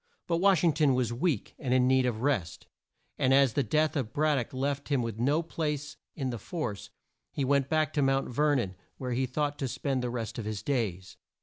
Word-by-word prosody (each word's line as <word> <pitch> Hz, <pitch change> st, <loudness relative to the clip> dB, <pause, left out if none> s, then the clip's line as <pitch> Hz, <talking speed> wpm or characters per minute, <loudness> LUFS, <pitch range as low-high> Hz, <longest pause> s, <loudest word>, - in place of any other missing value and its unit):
But 170 Hz, -, 0 dB
Wash 185 Hz, -2 st, +4 dB
ing 165 Hz, -3 st, +4 dB
ton 145 Hz, -3 st, +3 dB
was 125 Hz, -2 st, 0 dB
weak, 145 Hz, -, -1 dB
and 130 Hz, -3 st, 0 dB
in 125 Hz, -1 st, +4 dB
need 130 Hz, -1 st, +3 dB
of 115 Hz, -1 st, -2 dB
rest, 120 Hz, -, -1 dB, 0.5 s
and 130 Hz, +1 st, +4 dB
as 135 Hz, -4 st, +4 dB
the 140 Hz, -, +2 dB
death 155 Hz, +7 st, +1 dB
of 125 Hz, -6 st, -2 dB
Brad 155 Hz, 0 st, +2 dB
dock 120 Hz, -, -5 dB
left 140 Hz, +2 st, -2 dB
him 135 Hz, -4 st, +2 dB
with 115 Hz, -2 st, -4 dB
no 145 Hz, +7 st, +2 dB
place 150 Hz, -3 st, -3 dB, 0.2 s
in 135 Hz, -4 st, -2 dB
the 120 Hz, -, -5 dB
force, 105 Hz, -, -4 dB, 0.4 s
he 140 Hz, -, -1 dB
went 140 Hz, 0 st, +2 dB
back 155 Hz, -1 st, +1 dB
to 145 Hz, -, +1 dB
Mount 135 Hz, 0 st, +2 dB
Ver 145 Hz, +4 st, +2 dB
non 100 Hz, -8 st, -1 dB, 0.2 s
where 125 Hz, -2 st, -4 dB
he 130 Hz, +2 st, 0 dB
thought 145 Hz, +3 st, -2 dB
to 135 Hz, -, -1 dB
spend 135 Hz, +1 st, -2 dB
the 125 Hz, -, -2 dB
rest 120 Hz, -1 st, -4 dB
of 110 Hz, -, -5 dB
his 105 Hz, -1 st, -4 dB
days. 100 Hz, -9 st, -2 dB
135 Hz, 225 wpm, -29 LUFS, 120-150 Hz, 0.5 s, Wash